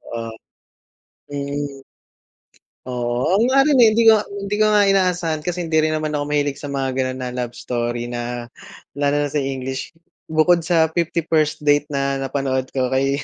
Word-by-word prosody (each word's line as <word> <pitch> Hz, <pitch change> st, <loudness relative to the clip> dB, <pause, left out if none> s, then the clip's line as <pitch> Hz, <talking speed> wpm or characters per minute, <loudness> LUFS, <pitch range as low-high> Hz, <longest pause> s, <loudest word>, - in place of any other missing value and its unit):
Oo, 115 Hz, -1 st, -5 dB, 1.0 s
mm. 140 Hz, -1 st, -4 dB, 1.1 s
Oo, 120 Hz, 0 st, -2 dB
ako 205 Hz, -, +3 dB
nga 270 Hz, +1 st, +4 dB
rin, 290 Hz, -3 st, +3 dB
eh, 230 Hz, -, +8 dB
hindi 230 Hz, +1 st, +3 dB
nga 220 Hz, -1 st, +6 dB
hindi 200 Hz, 0 st, -4 dB
ko -, -, +6 dB
nga 205 Hz, -1 st, +5 dB
inaasahan, 180 Hz, -5 st, +1 dB
kasi 175 Hz, -1 st, -2 dB
hindi 160 Hz, -1 st, 0 dB
rin 155 Hz, 0 st, +1 dB
naman 155 Hz, -1 st, -2 dB
ako 145 Hz, -1 st, -1 dB
mahilig 145 Hz, -1 st, 0 dB
sa 145 Hz, -, -6 dB
mga 135 Hz, -1 st, -1 dB
gano'n 130 Hz, 0 st, -1 dB
na 125 Hz, -, -3 dB
love 120 Hz, -1 st, -4 dB
story 120 Hz, 0 st, -3 dB
na 120 Hz, 0 st, -4 dB, 0.5 s
lalo 145 Hz, 0 st, +1 dB
na -, -, -3 dB
sa 150 Hz, -, 0 dB
English. 130 Hz, -1 st, -4 dB, 0.4 s
Bukod 165 Hz, +2 st, +3 dB
sa 165 Hz, -2 st, +3 dB
"50 170 Hz, -1 st, 0 dB
First 155 Hz, -2 st, +1 dB
Date" 145 Hz, 0 st, +3 dB
na 140 Hz, -1 st, -1 dB
napanood 130 Hz, -1 st, -2 dB
ko 130 Hz, -2 st, 0 dB
kay 135 Hz, +1 st, +1 dB
145 Hz, 175 wpm, -20 LUFS, 130-165 Hz, 1.1 s, eh